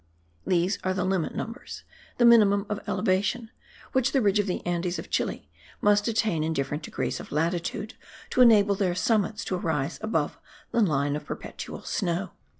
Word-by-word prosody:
These 180 Hz, +3 st, +1 dB
are 185 Hz, 0 st, 0 dB
the 185 Hz, -1 st, 0 dB
limit 190 Hz, -4 st, -1 dB
numbers, 230 Hz, +1 st, -6 dB, 0.3 s
the 240 Hz, -, +4 dB
minimum 205 Hz, -4 st, +6 dB
of 210 Hz, 0 st, -2 dB
elevation, 205 Hz, +4 st, 0 dB, 0.4 s
which 260 Hz, 0 st, +1 dB
the 270 Hz, -, +3 dB
ridge 205 Hz, 0 st, +3 dB
of 205 Hz, -, +1 dB
the 180 Hz, -, -3 dB
Andes 175 Hz, 0 st, -1 dB
of -, -, -8 dB
Chile -, -, -1 dB, 0.3 s
must 205 Hz, +1 st, +3 dB
attain 215 Hz, -8 st, +1 dB
in 160 Hz, +1 st, -1 dB
different 145 Hz, +1 st, -2 dB
degrees -, -, -3 dB
of -, -, -10 dB
latitude, 170 Hz, +7 st, -1 dB, 0.4 s
to 255 Hz, -, +3 dB
enable 210 Hz, -4 st, +6 dB
their 190 Hz, -3 st, 0 dB
summits 215 Hz, +2 st, 0 dB
to 185 Hz, -, -1 dB
rise 155 Hz, -6 st, -2 dB
above 160 Hz, -9 st, -1 dB, 0.3 s
the 235 Hz, -, +2 dB
line 145 Hz, -6 st, +1 dB
of 150 Hz, -, -5 dB
perpetual -, -, -7 dB
snow. 175 Hz, -1 st, -2 dB
195 Hz, 170 wpm, -27 LUFS, 170-215 Hz, 0.4 s, minimum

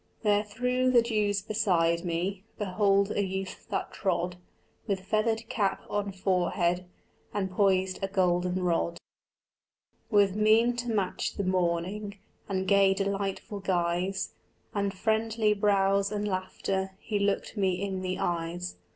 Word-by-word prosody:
There 205 Hz, -1 st, +3 dB
through 250 Hz, +4 st, 0 dB
the 240 Hz, -2 st, +5 dB
dews 210 Hz, -4 st, 0 dB
beside 175 Hz, -6 st, +1 dB
me 180 Hz, +3 st, -2 dB
Behold 200 Hz, 0 st, +2 dB
a 205 Hz, -, +1 dB
youth 190 Hz, 0 st, -5 dB
that -, -, -2 dB
trod, 180 Hz, -1 st, -1 dB, 0.5 s
With 195 Hz, -3 st, -1 dB
feathered 220 Hz, +3 st, 0 dB
cap 200 Hz, -3 st, 0 dB
on 205 Hz, -1 st, -1 dB
forehead, 180 Hz, -1 st, 0 dB, 0.5 s
And 190 Hz, -2 st, -1 dB
poised 190 Hz, -1 st, +2 dB
a 195 Hz, -, 0 dB
golden 180 Hz, -1 st, +1 dB
rod. 170 Hz, -1 st, 0 dB, 1.1 s
With 200 Hz, -3 st, +4 dB
mien 220 Hz, +3 st, +4 dB
to 240 Hz, 0 st, -3 dB
match 200 Hz, -5 st, -1 dB
the 200 Hz, -, -2 dB
morning 185 Hz, +3 st, -1 dB, 0.3 s
And 190 Hz, -1 st, -1 dB
gay 195 Hz, 0 st, +5 dB
delightful 200 Hz, +1 st, -2 dB
guise 180 Hz, 0 st, -1 dB, 0.4 s
And 200 Hz, -2 st, 0 dB
friendly 220 Hz, +2 st, +1 dB
brows 200 Hz, -1 st, +2 dB
and 210 Hz, 0 st, -1 dB
laughter 190 Hz, 0 st, -2 dB
He 210 Hz, -2 st, -2 dB
looked 200 Hz, +2 st, 0 dB
me 190 Hz, -3 st, +1 dB
in 190 Hz, -1 st, -2 dB
the 185 Hz, 0 st, -2 dB
eyes. 175 Hz, +1 st, -2 dB
195 Hz, 135 wpm, -29 LUFS, 185-210 Hz, 1.1 s, the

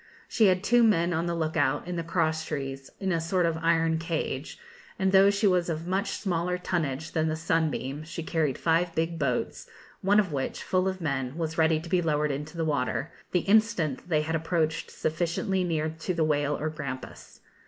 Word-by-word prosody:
She 220 Hz, -3 st, +4 dB
had 185 Hz, 0 st, +2 dB
two 240 Hz, +3 st, +4 dB
men 175 Hz, -6 st, +3 dB
on 165 Hz, +1 st, 0 dB
the 170 Hz, -, -1 dB
look 160 Hz, -1 st, -2 dB
out 145 Hz, +1 st, +1 dB
in 180 Hz, -, -3 dB
the 170 Hz, -, -1 dB
cross 160 Hz, -1 st, 0 dB
trees, 135 Hz, -2 st, -5 dB
in 190 Hz, -1 st, -1 dB
a 165 Hz, -2 st, +1 dB
sort 175 Hz, +2 st, +1 dB
of 165 Hz, -1 st, 0 dB
iron 165 Hz, -1 st, +2 dB
cage; 160 Hz, -4 st, -3 dB, 0.4 s
and 190 Hz, -3 st, +1 dB
though 195 Hz, +1 st, +7 dB
she 200 Hz, +1 st, +1 dB
was 180 Hz, -3 st, +3 dB
of 160 Hz, 0 st, -3 dB
much 190 Hz, +4 st, 0 dB
smaller 180 Hz, -2 st, -1 dB
tonnage 160 Hz, -4 st, -2 dB
than 160 Hz, 0 st, +1 dB
the 155 Hz, -, 0 dB
'Sunbeam,' 155 Hz, -3 st, -1 dB
she 165 Hz, +1 st, -6 dB
carried 155 Hz, -5 st, 0 dB
five 165 Hz, +1 st, +1 dB
big 165 Hz, +1 st, -1 dB
boats, 125 Hz, -4 st, -2 dB, 0.3 s
one 205 Hz, +2 st, +4 dB
of 185 Hz, -7 st, 0 dB
which, 135 Hz, -2 st, -3 dB
full 185 Hz, 0 st, +1 dB
of 190 Hz, -1 st, -3 dB
men, 135 Hz, -2 st, -2 dB
was 165 Hz, -1 st, -3 dB
ready 160 Hz, 0 st, +4 dB
to 165 Hz, -, -9 dB
be 180 Hz, +1 st, +2 dB
lowered 150 Hz, -2 st, +1 dB
into 150 Hz, +4 st, -5 dB
the 165 Hz, -, 0 dB
water, 140 Hz, 0 st, -1 dB, 0.2 s
the 180 Hz, -, +2 dB
instant 200 Hz, -, +2 dB
they 155 Hz, -2 st, +2 dB
had 160 Hz, +1 st, -1 dB
approached 160 Hz, -1 st, -1 dB
sufficiently 170 Hz, +4 st, -1 dB
near 160 Hz, -3 st, 0 dB
to 180 Hz, +2 st, -2 dB
the 165 Hz, -, +2 dB
whale 145 Hz, -1 st, +1 dB
or 155 Hz, -, -2 dB
grampus. 140 Hz, -5 st, -7 dB
165 Hz, 205 wpm, -27 LUFS, 155-180 Hz, 0.4 s, though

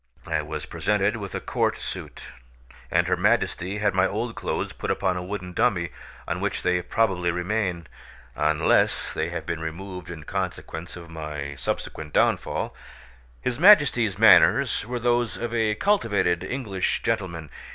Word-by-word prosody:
I 80 Hz, -2 st, 0 dB
was 75 Hz, 0 st, -5 dB
presented 105 Hz, +1 st, 0 dB
with 100 Hz, -3 st, -6 dB
a -, -, -1 dB
court -, -, 0 dB
suit, -, -, -7 dB, 0.6 s
and -, -, +2 dB
her -, -, +2 dB
Majesty 95 Hz, +4 st, +1 dB
had 105 Hz, -2 st, +1 dB
my 95 Hz, +1 st, +3 dB
old 115 Hz, +3 st, -3 dB
clothes -, -, -3 dB
put -, -, -5 dB
upon 95 Hz, -2 st, +1 dB
a 90 Hz, -, -3 dB
wooden 90 Hz, -1 st, -5 dB
dummy, 95 Hz, -6 st, +1 dB, 0.4 s
on -, -, -2 dB
which -, -, -2 dB
they 90 Hz, 0 st, +2 dB
probably 90 Hz, -2 st, +1 dB
remain, 90 Hz, -1 st, -1 dB, 0.5 s
unless 75 Hz, 0 st, +2 dB
they 80 Hz, +2 st, -1 dB
have 85 Hz, -1 st, -5 dB
been 85 Hz, -1 st, -3 dB
removed 90 Hz, +2 st, -6 dB
in 80 Hz, -3 st, -7 dB
consequence 80 Hz, +3 st, -4 dB
of 85 Hz, -2 st, -10 dB
my 75 Hz, -3 st, -5 dB
subsequent 75 Hz, +2 st, -4 dB
downfall. -, -, +1 dB, 0.7 s
His 125 Hz, +1 st, -2 dB
Majesty's 140 Hz, -, +6 dB
manners 105 Hz, +4 st, +5 dB
were 125 Hz, 0 st, -2 dB
those 120 Hz, -5 st, +1 dB
of 120 Hz, +3 st, -4 dB
a 110 Hz, -2 st, +1 dB
cultivated 105 Hz, -, +1 dB
English 100 Hz, -5 st, -2 dB
gentleman. 90 Hz, -9 st, -2 dB
95 Hz, 150 wpm, -25 LUFS, 85-110 Hz, 0.7 s, Majesty's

